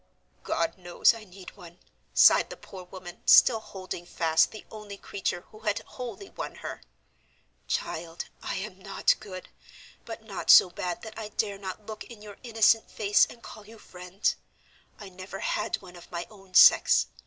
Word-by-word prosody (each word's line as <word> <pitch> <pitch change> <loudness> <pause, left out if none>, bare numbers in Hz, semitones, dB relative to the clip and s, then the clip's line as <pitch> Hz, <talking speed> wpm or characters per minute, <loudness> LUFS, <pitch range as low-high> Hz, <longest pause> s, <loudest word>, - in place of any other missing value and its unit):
"God 165 +2 -1
knows 175 +5 +3
I 225 -2 -10
need 185 -1 -13
one!" 175 -3 -14 0.3
sighed - - +6
the - - -8
poor 185 -2 -11
woman, 180 -1 -11
still 230 -3 +7
holding 185 -4 -8
fast 160 -2 +2
the 215 - -11
only 210 -2 -9
creature 195 -3 -3
who 215 - -14
had 210 -1 -1
wholly 250 - -8
won - - -6
her. - - -7 0.9
"Child, 165 +1 -4 0.2
I - - -4
am 195 0 -6
not 195 0 +1
good, 185 -4 -9 0.5
but - - -9
not - - -7
so 180 - +9
bad 175 0 -4
that 220 -1 -9
I 215 -1 -6
dare 205 -2 -2
not 195 +2 -7
look 215 0 -7
in 225 -3 -13
your 205 -2 -11
innocent 225 -1 +3
face 205 -1 +3
and 235 - -14
call 210 -1 -11
you 225 +1 -13
friend. 180 -1 -3 0.7
I 200 - -9
never 185 +1 -9
had - - -1
one 180 -1 -13
of 175 - -14
my 170 -1 -4
own 195 -3 -17
sex. - - +7
195 Hz, 175 wpm, -27 LUFS, 180-215 Hz, 0.9 s, so